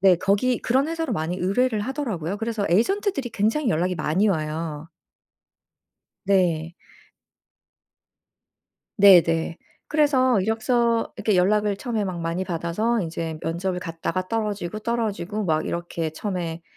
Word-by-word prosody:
네 190 Hz, -2 st, +6 dB
거기 200 Hz, +7 st, +1 dB
그런 265 Hz, +5 st, +1 dB
회사로 325 Hz, -1 st, -2 dB
많이 160 Hz, +3 st, -2 dB
의뢰를 215 Hz, +5 st, +1 dB
하더라고요. 210 Hz, -, -3 dB
그래서 225 Hz, -2 st, -2 dB
에이전트들이 275 Hz, -, +1 dB
굉장히 225 Hz, +7 st, 0 dB
연락이 180 Hz, -1 st, +1 dB
많이 180 Hz, +6 st, +1 dB
와요. 155 Hz, -2 st, -3 dB, 1.4 s
네. 175 Hz, -4 st, +1 dB, 2.2 s
네네. 170 Hz, -4 st, +5 dB, 0.3 s
그래서 260 Hz, -7 st, +3 dB
이력서 230 Hz, +2 st, +1 dB
이렇게 205 Hz, -1 st, 0 dB
연락을 205 Hz, +2 st, +2 dB
처음에 225 Hz, -2 st, -2 dB
막 180 Hz, -3 st, -4 dB
많이 165 Hz, +3 st, -2 dB
받아서 185 Hz, +7 st, -1 dB
인제 165 Hz, -2 st, -4 dB
면접을 180 Hz, +3 st, -2 dB
갔다가 165 Hz, +2 st, -3 dB
떨어지고 210 Hz, -3 st, -2 dB
떨어지고 215 Hz, -3 st, -2 dB
막 155 Hz, -3 st, 0 dB
이렇게 170 Hz, -2 st, -3 dB
처음에 170 Hz, -1 st, -4 dB
195 Hz, 300 characters per minute, -24 LUFS, 170-230 Hz, 2.2 s, 네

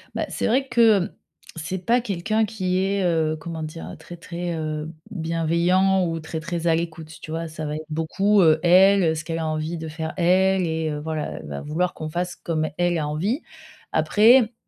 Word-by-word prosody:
Bah, -, -, -1 dB
c'est -, -, -2 dB
vrai 265 Hz, +4 st, +2 dB
que, 220 Hz, -7 st, +4 dB, 0.5 s
c'est 175 Hz, +3 st, -5 dB
pas 240 Hz, +4 st, +4 dB
quelqu'un 215 Hz, +1 st, 0 dB
qui 190 Hz, -4 st, -2 dB
est, 195 Hz, 0 st, 0 dB
heu, 160 Hz, -3 st, +1 dB
comment 160 Hz, +1 st, -6 dB
dire? 90 Hz, -, -7 dB
Très, 175 Hz, -, -10 dB
très, 170 Hz, +1 st, -5 dB
heu, 155 Hz, -1 st, -3 dB, 0.2 s
bienveillant 175 Hz, +2 st, +1 dB
ou 165 Hz, 0 st, -3 dB
très, 160 Hz, 0 st, -5 dB
très 170 Hz, +1 st, -3 dB
à 165 Hz, -, +4 dB
l'écoute, 160 Hz, -1 st, -4 dB
tu 155 Hz, -, -8 dB
vois? 165 Hz, +1 st, -3 dB
Ça 155 Hz, 0 st, -6 dB
va 150 Hz, -, -3 dB
être 155 Hz, +1 st, -6 dB
beaucoup, 195 Hz, +6 st, +2 dB
heu 160 Hz, -2 st, +5 dB
elle, 180 Hz, -1 st, +5 dB
ce 155 Hz, -, -4 dB
qu'elle 165 Hz, -1 st, -3 dB
a 160 Hz, -, -2 dB
envie 155 Hz, +2 st, -2 dB
de 160 Hz, 0 st, -6 dB
faire, 160 Hz, +1 st, -5 dB
elle, 185 Hz, +1 st, +3 dB
et, 160 Hz, 0 st, -1 dB
heu, 150 Hz, -1 st, -3 dB
voilà. 155 Hz, 0 st, -3 dB
Elle -, -, -11 dB
va 70 Hz, -1 st, -5 dB
vouloir 170 Hz, +4 st, -1 dB
qu'on 155 Hz, 0 st, -6 dB
fasse 175 Hz, +2 st, -3 dB
comme 155 Hz, -2 st, -2 dB
elle 175 Hz, -1 st, +1 dB
a 150 Hz, -2 st, -1 dB
envie. 190 Hz, -, -1 dB, 0.5 s
Après, 230 Hz, +2 st, +5 dB
170 Hz, 200 wpm, -23 LUFS, 160-190 Hz, 0.5 s, heu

